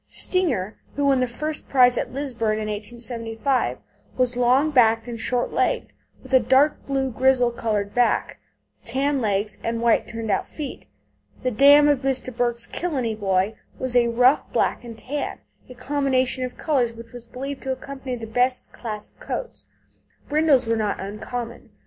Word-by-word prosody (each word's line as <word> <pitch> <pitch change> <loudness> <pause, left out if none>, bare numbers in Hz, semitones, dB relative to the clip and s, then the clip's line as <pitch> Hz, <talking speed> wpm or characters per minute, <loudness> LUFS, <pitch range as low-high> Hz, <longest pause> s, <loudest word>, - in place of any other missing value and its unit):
Stinger, 250 - 0 0.2
who 285 - 0
won 275 -2 +4
the 255 - +1
first 305 +6 -4
prize 250 -2 +5
at - - -2
Lisburn 245 -5 -2
in 215 0 -3
1875, 230 +3 -2 0.3
was 250 -1 +2
long 255 +5 +3
backed 225 -4 +4
and 235 -1 -6
short 245 +2 -1
legged, - - 0 0.3
with - - -10
a 260 - +8
"dark 265 +5 +3
blue 270 -1 0
grizzle 250 0 +3
coloured 210 -4 -2
back, 245 0 +1 0.4
tan 275 +1 0
legs, 205 -1 -1
and 230 0 -1
white 235 0 +2
turned 225 -2 -4
out - - 0
feet." 295 -4 -7 0.6
The 255 - +1
dam 285 +5 +7
of 290 -3 +3
Mr. 260 -2 -1
Burke's 240 -1 0
Killeney 265 -10 -2
Boy 195 -1 0 0.2
was 255 -1 -3
a 240 -1 +5
rough 250 +4 +3
black - - 0
and 230 -2 -9
tan, 285 +5 -4 0.3
a 250 - -10
combination 260 -1 0
of 250 - -8
colours 255 -7 +1
which 230 0 -12
was 245 -1 -11
believed 270 +3 -6
to 265 - -3
accompany 265 -1 -5
the 230 -2 -7
best 250 +3 0
class 215 -3 -6
of - - -36
coats. - - -6 0.6
Brindles 295 -4 +3
were 230 0 +1
not 210 -2 -1
uncommon. 225 +4 -6
245 Hz, 165 wpm, -23 LUFS, 230-270 Hz, 0.6 s, a